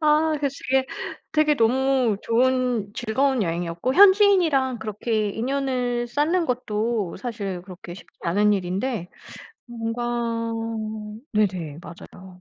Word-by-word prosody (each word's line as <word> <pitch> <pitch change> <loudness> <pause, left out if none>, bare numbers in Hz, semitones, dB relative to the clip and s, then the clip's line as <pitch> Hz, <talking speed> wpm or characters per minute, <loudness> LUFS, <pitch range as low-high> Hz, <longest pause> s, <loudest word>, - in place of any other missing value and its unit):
아 310 +1 +3
그래서 280 -2 -1 0.2
되게 265 0 +3 0.5
되게 305 -1 +3
너무 250 -1 +2
좋은 245 -3 +1
즐거운 255 +1 +1
여행이었고 170 +7 -2
현지인이랑 370 - +5
그렇게 215 0 -1
인연을 250 0 -1
쌓는 325 +7 +1
것도 225 -5 -1
사실 200 -5 -5
그렇게 180 -1 -10
쉽지 - - -16
않은 205 +5 +3
일인데 190 +1 -2 0.6
뭔가 235 0 -4 1.3
네네. 180 -8 0
맞아요. 175 +2 -12
240 Hz, 260 characters per minute, -24 LUFS, 200-265 Hz, 1.3 s, 현지인이랑